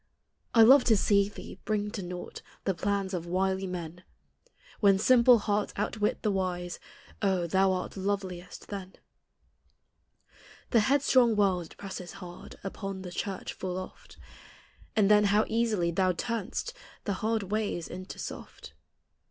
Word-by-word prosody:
I 225 - +9
love 260 +3 +8
to 220 -3 +5
see 200 0 +3
thee 200 - -10
bring 210 -1 -1
to 210 - -4
naught 180 0 -7 0.2
The 195 - +1
plans 195 +2 -1
of 175 -2 -3
wily 190 +2 0
men; 175 -1 -6 0.8
When 200 -2 +5
simple 245 +3 +6
hearts 205 -1 -1
outwit 210 +1 -1
the 210 - +2
wise, 180 -2 -2 0.4
Oh? 190 -4 +1
thou 190 +3 +3
art 185 -1 -3
loveliest 190 -2 -4
then. 195 -2 -6 1.8
The 235 - +5
headstrong 255 -1 +4
world 190 -5 +2
it - - -26
presses 190 -3 -7
hard 175 -2 -10
Upon 195 -1 -5
the 180 - -7
church 195 +1 -4
full 185 -1 -4
oft. 185 - -9 0.8
And 210 -3 +4
then 210 0 +6
how 205 +2 +3
easily 220 -7 +1
thou 185 +1 +2
turn'st 230 - -3 0.3
The 200 - -1
hard 220 -1 0
ways 210 -6 -1
into 185 +2 -8
soft. - - -8
195 Hz, 145 wpm, -29 LUFS, 185-215 Hz, 1.8 s, I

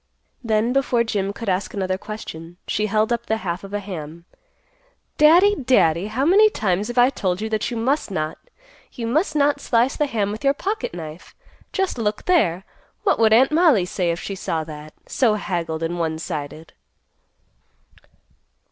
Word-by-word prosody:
Then, 225 +1 +1
before 260 -3 +2
Jim 200 -3 -2
could 225 +2 -8
ask 190 +1 -1
another 190 -1 -1
question, 175 -6 -8
she 215 +1 -1
held 215 +2 +1
up 235 - -4
the 220 - +1
half 175 +1 -3
of 195 - -9
a 205 - -2
ham; 170 -4 -8 0.9
"Daddy, 345 +7 +6
Daddy! 205 - +2
How 240 +6 -1
many 410 +6 +6
times 205 - -1
have 240 +1 -6
I 245 +2 +5
told 185 -7 -2
you 220 +1 -3
that 215 -1 -1
you 240 - -4
must 265 +6 0
not—you 240 - -7
must 305 - 0
not 290 0 +2
slice 240 +3 +1
the 295 - 0
ham 210 -6 -1
with 215 +5 -7
your 275 0 +3
pocket 405 - -3
knife? 160 0 -9 0.4
Just 385 - -1
look 210 -1 -2
there! 190 - +2 0.4
What 400 - +2
would 220 -1 +4
Aunt 255 +6 +5
Mollie 305 - +4
say 180 -1 -1
if 170 0 -1
she 200 - -5
saw 165 -4 -3
that, 155 -1 -10
so 230 -5 +2
haggled 170 -5 -3
and 175 +1 -2
one 160 -1 -1
sided?" 155 0 -6
215 Hz, 175 wpm, -22 LUFS, 175-265 Hz, 0.9 s, Daddy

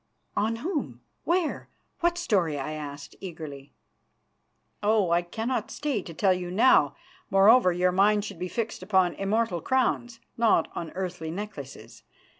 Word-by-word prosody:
"On 220 +2 +1
whom? 240 - -4 0.2
Where? 345 -1 0 0.3
What 345 0 +1
story?" 190 - +1
I 140 +2 -4
asked 145 -2 -7
eagerly. 155 -6 -8 1.1
"Oh! 205 -4 +2
I 170 +1 +4
cannot 225 +8 -3
stay 285 -8 -2
to 170 - -9
tell 190 +2 +3
you 180 -1 -4
now. 180 - +4 0.3
Moreover, 195 +1 +6
your 180 +1 +2
mind 205 +2 +3
should 170 - -8
be 180 - -2
fixed 225 +2 -3
upon 185 -2 +2
immortal 195 -2 0
crowns, 245 0 0
and 230 - -28
not 220 -8 +3
on 165 - -5
earthly 180 -3 -4
necklaces. 165 -7 -8
190 Hz, 145 wpm, -27 LUFS, 170-230 Hz, 1.1 s, Moreover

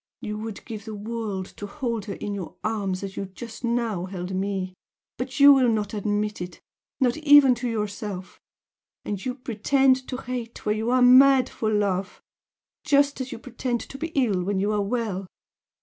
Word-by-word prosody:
You 210 0 -5
would 220 -1 -7
give 220 -3 -7
the 220 -1 -6
world 210 -2 -4
to 205 - -6
hold 230 -2 -3
her 200 - -5
in 205 - -4
your 195 -4 -6
arms 200 -4 -2
as 195 -1 -6
you 200 - -3
just 225 +6 -10
now 230 -6 0
held 185 0 -5
ME 190 -1 -2 0.5
but 260 +3 -4
you 285 0 +10
will 260 -3 +4
not 210 -2 -1
admit 210 -1 -1
it 180 0 -7 0.4
not 250 -1 +2
even 290 -4 +7
to 245 - -1
yourself 205 -3 -4 0.6
and 205 -2 -4
you 255 -1 -2
pretend 260 +2 +2
to 255 - -4
hate 245 -2 -6
when 210 - +2
you 220 +2 -1
are 255 0 +4
mad 260 +1 +7
for 220 - -2
love! 200 -3 0 0.6
just 285 -2 +3
as 255 - -5
you - - -5
pretend 245 0 -3
to 270 - -9
be 325 - -2
ill 225 -9 +2
when 195 +1 -1
you 205 +2 +1
are 210 -1 +1
well! 200 -3 -2
220 Hz, 185 wpm, -25 LUFS, 200-255 Hz, 0.6 s, you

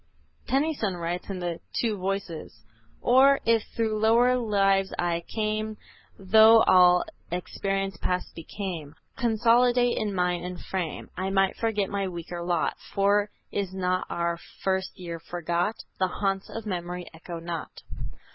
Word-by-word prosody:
Tennyson 270 - 0
writes 175 +2 -4
in 195 - -3
the 175 -2 -3 0.2
"Two 225 -3 +1
Voices;" 185 - -4 0.4
"Or, 270 +3 +6
if 230 -1 +4
through 220 -2 0
lower 235 +3 +4
lives 195 -5 +2
I 170 -1 0
came 215 0 -2 0.4
Tho' 220 +3 +7
all 180 -1 +6 0.3
experience 195 +2 -2
past 180 0 -2
became, 165 -3 -6 0.2
Consolidate 240 +1 +3
in 205 -2 -2
mind 180 -1 0
and 180 0 -5
frame 180 -5 -4
I 190 +1 -2
might 195 0 +2
forget 210 -4 -1
my 200 -1 -1
weaker 175 -1 -6
lot; 170 -1 0 0.2
For 200 +1 +3 0.2
is 195 -2 -3
not 185 -1 0
our 170 0 -1 0.2
first 190 -1 -1
year 170 -2 -6
forgot? 175 +4 -2 0.2
The 185 - +3
haunts 195 +1 -2
of 225 -1 -6
memory 180 -2 -4
echo 170 +1 -8
not." 165 -1 -6
195 Hz, 135 wpm, -27 LUFS, 175-215 Hz, 0.4 s, Tho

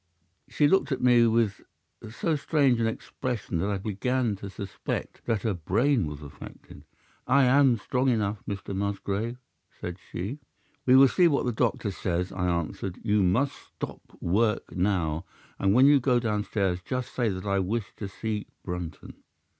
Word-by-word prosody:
"'She 145 - +3
looked 190 -1 +2
at 130 - 0
me 120 -2 +6
with 110 -3 +1 0.5
so 155 +8 -1
strange 140 -4 +2
an 115 - +2
expression 115 -5 -3
that 100 - 0
I 100 - 0
began 110 +3 -1
to 100 +1 -7
suspect 100 0 -5
that 115 -4 0
her 110 - +1
brain 100 - +1
was 75 0 -7
affected. 70 - -12 0.4
"'"I 140 +1 +5
am 130 -1 +5
strong 130 +4 0
enough, 105 -4 0
Mr. 100 -1 -4
Musgrave," 100 +3 -2 0.4
said 90 +1 -5
she. 105 - -4 0.5
"'"We 130 - +7
will 135 +1 +9
see 175 +6 +4
what 145 -5 +1
the 125 - +1
doctor 110 -2 0
says," 90 -1 -2
I 90 -1 -1
answered. 85 +2 -2
"You 105 -2 +2
must 115 +10 +2
stop - - -8 0.2
work 105 +4 0
now, 90 -4 0 0.4
and 95 - +3
when 130 +2 +7
you 145 0 +7
go 125 -1 +3
downstairs 105 -5 -1
just 125 +5 -4
say 120 -3 +1
that 95 0 -4
I 100 -1 +1
wish 100 +3 -2
to 100 - -4
see 105 +2 -4 0.2
Brunton." 90 -2 -6
105 Hz, 165 wpm, -27 LUFS, 95-125 Hz, 0.5 s, will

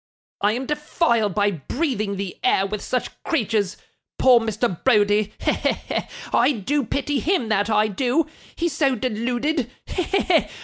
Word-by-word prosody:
'I 205 +1 +3
am 255 +3 -3
defiled 295 - 0
by 205 -1 +3
breathing 210 - -2
the 195 -2 -4
air 195 - +3
with 210 +1 -4
such 250 - -2
creatures. 215 - 0 0.4
Poor 255 -2 +6
Mr. 220 -4 -2
Browdie! 210 -3 +3
He! - - +1
he! - - +1
he! - - -3 0.3
I 290 - +4
do 270 +6 -1
pity 280 +3 -1
him, 305 - 0
that 205 0 +1
I 215 0 +3
do; 255 +9 +1 0.3
he's 335 -2 -1
so 275 -3 +2
deluded. 245 +4 -1
230 Hz, 145 wpm, -23 LUFS, 205-275 Hz, 0.4 s, Poor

